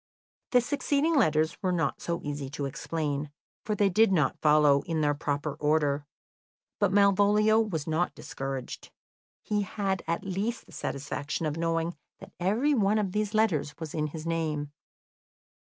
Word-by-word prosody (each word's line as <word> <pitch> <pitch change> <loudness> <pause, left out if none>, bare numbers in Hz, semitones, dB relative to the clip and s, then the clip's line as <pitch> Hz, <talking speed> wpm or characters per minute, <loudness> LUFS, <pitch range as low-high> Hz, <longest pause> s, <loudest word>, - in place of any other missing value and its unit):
The 250 - +5
succeeding 285 +4 0
letters 155 - +2
were 185 - +1
not 165 -5 -1
so 170 0 -2
easy 145 -2 -4
to 140 - -2
explain, 150 0 -3 0.3
for 210 - -1
they 205 0 +3
did 220 +2 +4
not 155 -7 +1
follow 150 -2 +5
in 165 -2 0
their 145 -1 +2
proper 145 0 -2
order. 150 -1 +1 0.7
But 205 -3 +2
Malvolio 205 +2 +4
was 180 -10 -1
not 165 +2 0
discouraged; 135 -2 -6 0.5
he 210 -1 0
had 195 -1 -2
at 170 - -1
least 195 +5 -3
the - - -18
satisfaction 145 +3 -4
of 150 -1 -1
knowing 165 +1 -1 0.2
that 195 0 -13
every 220 +11 +2
one 210 -4 +2
of 205 -3 0
these 210 +1 -1
letters 180 -10 +1
was 160 -2 -7
in 155 -1 -1
his 155 +1 -7
name. 155 -3 -2
165 Hz, 155 wpm, -28 LUFS, 150-205 Hz, 0.7 s, The